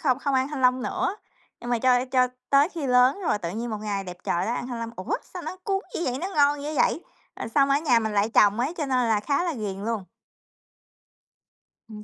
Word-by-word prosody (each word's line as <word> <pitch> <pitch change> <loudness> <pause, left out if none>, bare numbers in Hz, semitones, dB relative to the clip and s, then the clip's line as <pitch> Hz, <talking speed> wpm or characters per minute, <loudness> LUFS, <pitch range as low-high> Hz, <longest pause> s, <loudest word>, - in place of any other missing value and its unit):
không 255 -4 +2
không 280 -1 -1
ăn 260 +1 +2
thanh 295 -3 -5
long 255 0 +3
nữa. 365 - -2 0.4
Nhưng 240 0 -6
mà 240 - +2
cho 250 +1 +3
cho 255 -1 +2 0.2
tới 280 +2 +5
khi 325 -7 -5
lớn 250 +8 +4
rồi 210 - +1
tự 170 -4 -4
nhiên 230 +5 -4
một 215 - -3
ngày 200 -2 -2
đẹp 180 -1 -8
trời 175 - 0
đó 230 - 0
ăn 245 - -4
thanh 245 -2 -5
long, 230 0 -4
ủa, 185 - -2 0.2
sao 360 - -5
nó 370 - -6
cuốn 390 -1 0
dữ - - -2
vậy, 255 +1 -1
nó 365 - -2
ngon 285 0 +3
dữ 305 +1 -4
vậy, 330 - +1 0.4
rồi - - -3
xong 275 +3 +3
ở 275 - +5
nhà 270 -6 +3
mình 220 -1 -2
lại 205 +1 +2
trồng 210 +3 +5
ấy 290 +8 -1
cho 300 -4 -2
nên 250 -3 +1
là 215 -2 +2
khá 280 +7 0
là 345 - -1
ghiền 205 -5 -4
luôn. 225 -4 -2 1.9
Ừm. 210 -1 -9
250 Hz, 250 wpm, -25 LUFS, 220-285 Hz, 1.9 s, tới